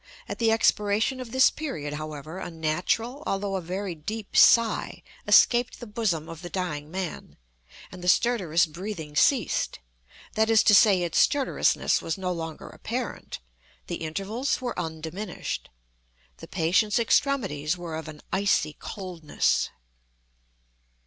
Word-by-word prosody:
At - - -6
the 225 -1 +3
expiration 220 +3 +2
of 250 -3 -7
this 260 0 +5
period, 155 - -5
however, 155 +2 -6
a - - -5
natural 175 - -1
although 195 0 -1
a 190 - -2
very 185 +2 -4
deep 205 +7 -7
sigh 230 -1 +4 0.2
escaped 240 0 +5
the 240 - -7
bosom 210 -8 -1
of 165 -1 -9
the 175 - -7
dying 155 -6 -4
man, 185 -1 -6 0.5
and 180 -1 -10
the - - -4
stertorous 185 -5 +3
breathing 160 -2 -7
ceased—that 145 - -1
is 225 -1 +5
to 210 - +5
say, 195 -3 +6
its 170 - 0
stertorousness 280 -2 +2
was 165 - -3
no 185 -1 -2
longer 165 -3 -6
apparent; - - -5 0.5
the 175 - -4
intervals 195 - -2
were 245 -7 -4
undiminished. 165 +4 -5 0.7
The - - -11
patient's 190 +5 +2
extremities 195 - +1
were 170 -2 -6
of 160 -1 -6
an 155 -1 -10
icy 190 -6 +2
coldness. 180 -6 -1
185 Hz, 135 wpm, -26 LUFS, 160-220 Hz, 0.7 s, say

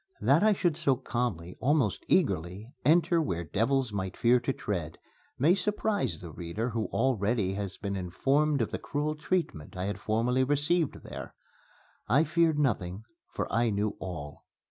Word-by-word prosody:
That 135 +9 +4
I 215 +1 +5
should 175 -5 +1
so 145 -6 +3
calmly, 120 -9 -3
almost 135 -6 +1
eagerly, 90 +9 0
enter 170 +2 +4
where 85 - -2
devils 115 - 0
might 95 -2 -3
fear 125 +1 +4
to 120 +3 -1
tread 85 - -4 0.4
may 155 +7 +4
surprise 205 - 0
the 85 -2 -8
reader 90 +10 -4
who 115 -1 -1
already 110 -5 +1
has 100 -1 -4
been 100 -2 -3
informed 135 - +1
of - - -4
the - - -3
cruel 150 +1 -2
treatment 150 - -2
I 90 - -2
had 100 -1 -3
formerly 115 +6 +1
received 145 +4 +1
there. - - -8 0.7
I 135 +7 +5
feared 165 0 +2
nothing, 105 -8 0 0.3
for - - -3
I 115 0 +3
knew 105 0 -1
all. 75 -6 -7
120 Hz, 160 wpm, -29 LUFS, 95-145 Hz, 0.7 s, I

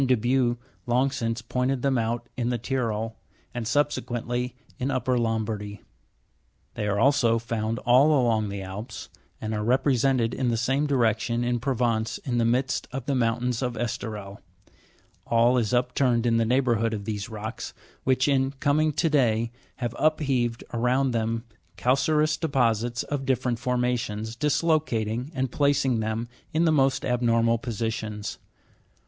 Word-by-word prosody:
de 130 -1 +4
Buch 120 +1 +1 0.3
long 125 +3 +2
since 115 -2 -2
pointed 125 +2 -1
them 135 -1 +2
out 120 0 -1
in 120 -1 -1
the 120 - 0
Tyrol, 115 -3 -2 0.4
and 120 -2 -3
subsequently 125 -3 -1 0.2
in 130 - -1
upper 130 -1 0
Lombardy. 110 -3 -2 0.9
They 105 - -3
are 100 0 0
also 125 -3 +4
found 115 0 -2
all 125 +3 +5
along 110 -4 +1
the 100 -1 -5
Alps, 105 +5 -7 0.3
arid 110 0 -2
are 105 0 -1
repre 130 +4 +3
sented 125 -2 +2
in 130 -2 0
the 115 - 0
same 135 +5 +1
direction 120 -3 +1
in 120 0 0
Provence 115 -3 0
in 120 -2 -2
the 115 - +2
midst 125 +3 0
of 130 -2 -5
the 140 - 0
mountains 120 0 0
of 125 -2 -2
Esterel: 105 -4 -4 0.9
all 120 +2 +4
is 110 -2 -1
upturned 125 -1 +2
in 115 -1 +3
the 115 - +2
neighbourhood 115 -2 +2
of 100 -2 -6
these 105 -1 -4
rocks, 110 +1 -6 0.3
which, 130 +1 +2
in 135 -2 +2
" - - -29
coming 155 +2 +2
to 165 - +1
day," 115 -6 +2 0.2
have 120 -2 -4
upheaved 135 -7 +1
around 125 +3 +2
them 115 0 -1 0.3
calcareous 150 +4 +2
deposits 120 -6 +1
of 145 -2 -3
dif 130 -2 0
ferent 120 -2 -1
formations, 120 -4 -1
dislocating, 135 -4 0
and 130 -2 -1
placing 140 -4 +2
them 110 +2 -2 0.3
in 165 +2 +3
the 160 - +4
most 135 -2 +2
abnormal 115 -2 +2
posi 115 -1 -2
tions. 105 -2 -5
120 Hz, 155 wpm, -26 LUFS, 115-130 Hz, 0.9 s, all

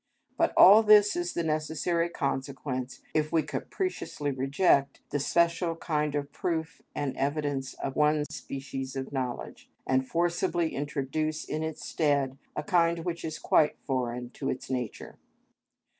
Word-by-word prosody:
But - - +2
all 205 +4 +10
this 210 -1 +6
is 175 0 -2
the 170 - 0
necessary 160 +2 0
consequence 135 -3 -3
if 155 0 +1
we 160 -2 +3
capriciously 365 - -3
reject 140 +2 +2
the 145 - 0
special 170 +3 +2
kind 150 -3 -1
of 145 -1 -2
proof 165 -1 -3
and 145 -2 -2
evidence 140 -1 -1
of 135 - -4
one 150 0 +3
species 135 0 -6
of 135 +1 -5
knowledge, 130 -3 -4 0.2
and 130 0 +1
forcibly 170 0 0
introduce 150 +2 -2
in 155 - -3
its 160 -1 -4
stead 140 -4 +1 0.2
a - - -2
kind 170 -3 +2
which 170 -1 -3
is 155 -1 -4
quite 150 - +3
foreign 125 -2 -2
to 135 - -4
its 130 0 -4
nature. 125 -4 -4
150 Hz, 145 wpm, -28 LUFS, 135-165 Hz, 0.2 s, all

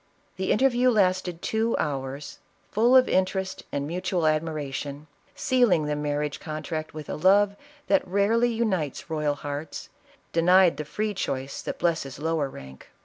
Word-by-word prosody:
The 190 0 -1
interview 255 +1 +3
lasted 185 -5 +1
two 225 +1 0
hours, 140 -1 -4 0.3
full 235 +5 +4
of 255 -1 +7
interest 190 0 -1
and 140 0 -2
mutual 175 +1 -1
admiration, 150 -2 -2 0.3
sealing 245 - +3
the 150 0 -1
marriage 150 0 -2
contract 155 0 -5
with 155 -2 -7
a - - -4
love 200 +4 +4 0.3
that 285 -6 +2
rarely 210 +6 +2
unites 190 - -2
royal 150 -2 0
hearts, 145 +2 -6 0.4
denied 180 +1 +5
the 150 - -4
free 210 +7 -2
choice 135 -7 -3
that - - -5
blesses 160 -6 -1
lower 155 -1 -1
rank. 65 - -12
165 Hz, 145 wpm, -26 LUFS, 150-200 Hz, 0.4 s, of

